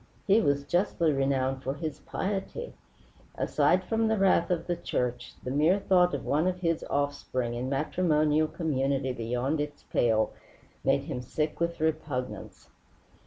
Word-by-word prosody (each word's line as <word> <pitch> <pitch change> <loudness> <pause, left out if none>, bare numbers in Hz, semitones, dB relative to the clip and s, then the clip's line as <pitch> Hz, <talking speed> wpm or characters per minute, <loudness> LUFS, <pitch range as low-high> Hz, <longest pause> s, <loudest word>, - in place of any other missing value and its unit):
He 205 +3 +5
was 140 -1 +1
justly 170 -1 +1
renowned 135 -1 0
for 135 +1 -3
his 155 -2 -5
piety. 205 - -4 0.6
Aside 185 +1 +2
from 225 +4 +1
the 220 0 +2
wrath 190 -3 +3
of 175 -2 0
the 175 - -1
church, 125 -6 -3
the 125 - -3
mere 155 +7 +4
thought 180 -2 +3
of - - -5
one 155 +5 +2
of 180 0 -2
his 165 -2 0
offspring 140 -4 -1
in 125 +2 -3
matrimonial 155 +1 +2
community 135 -5 -1
beyond 125 +6 -1
its 145 0 -6
pale 110 -2 +2 0.5
made - - +2
him 125 - -4
sick 150 +5 -2
with 170 0 -1
repugnance. 155 -5 -3
150 Hz, 150 wpm, -28 LUFS, 135-175 Hz, 0.6 s, He